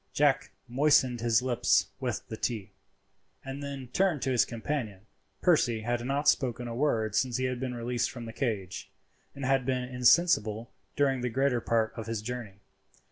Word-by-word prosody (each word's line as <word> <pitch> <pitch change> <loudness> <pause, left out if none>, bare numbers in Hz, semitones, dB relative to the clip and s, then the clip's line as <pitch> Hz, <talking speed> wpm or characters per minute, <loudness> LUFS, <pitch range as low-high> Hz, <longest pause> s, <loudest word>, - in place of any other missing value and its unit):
Jack 145 -2 +2 0.2
moistened 130 -2 +3
his 120 0 +3
lips 125 -2 +2
with 125 -4 -3
the 110 - -5
tea, 110 -3 -3 0.7
and 135 +1 -6
then 140 -2 -6
turned 180 -5 +1
to 135 - 0
his 125 - +4
companion. 115 -4 -4 0.4
Percy 120 -10 +3
had 120 +1 -1
not 140 +3 -1
spoken 120 -2 +2
a 115 - -5
word 115 -5 0
since 125 +1 +1
he 130 - -1
had 125 -1 -2
been 125 -1 -3
released 120 0 -1
from 120 -2 -8
the 115 - -8
cage, 105 -9 -3 0.5
and 140 -1 -5
had 135 0 +2
been 130 0 -1
insensible 125 -3 +2 0.2
during 135 -3 +2
the 125 - -1
greater 130 0 +1
part 110 -1 +1
of 115 -1 -6
his 115 -2 -3
journey. 110 -4 -6
125 Hz, 175 wpm, -29 LUFS, 115-135 Hz, 0.7 s, his